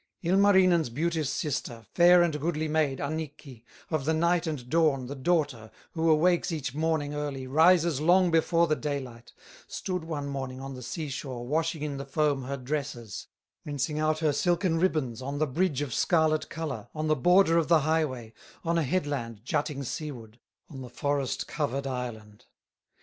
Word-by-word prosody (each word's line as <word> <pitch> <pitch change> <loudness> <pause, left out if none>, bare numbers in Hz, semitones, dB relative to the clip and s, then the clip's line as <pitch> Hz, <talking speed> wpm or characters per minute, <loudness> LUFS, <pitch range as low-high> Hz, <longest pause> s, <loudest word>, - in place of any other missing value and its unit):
Ilmarinen's 185 -4 +4
beauteous 160 +3 -1
sister, 125 -6 -3
Fair 175 0 +6
and 160 -3 -1
goodly 160 0 -1
maid, 150 -3 +1
Annikki, 145 -5 -6 0.3
Of 155 -4 -1
the 160 +1 +2
Night 170 +1 +1
and 145 -6 -4
Dawn, 150 -3 +2
the 135 - -6
daughter, 140 -6 0 0.2
Who 165 0 0
awakes 175 +3 +3
each 145 -5 -3
morning 155 -1 -1
early, 145 -3 -4
Rises 160 +2 +4
long 175 +2 +4
before 165 +1 +3
the 155 -2 +1
daylight, 130 -6 -5 0.4
Stood 180 -3 -4
one 155 -3 -4
morning 135 -2 -5
on 135 0 -6
the 130 - -8
sea 155 +4 -5
shore, 130 -3 -5
Washing 160 +1 -1
in 145 -2 -3
the 140 - -5
foam 140 -2 0
her 140 +1 -3
dresses, 130 -6 -5 0.4
Rinsing 145 +1 -2
out 155 0 +1
her 155 -2 +2
silken 175 0 +1
ribbons, 150 -10 0
On 140 +2 -4
the 155 - +2
bridge 150 0 0
of 135 -5 -5
scarlet 155 0 +2
color, 140 -9 -5
On 155 0 -2
the 155 0 +2
border 175 +3 +4
of 165 - -1
the 165 -2 +5
highway, 140 -7 -1 0.3
On 170 0 +1
a - - +1
headland 135 - -2
jutting 145 -1 -1
seaward, 125 -5 -6 0.3
On 135 -5 -9
the 125 - -8
forest 140 +1 -2
covered 140 -3 -2
island. 120 -5 -6
150 Hz, 170 wpm, -28 LUFS, 135-165 Hz, 0.4 s, Fair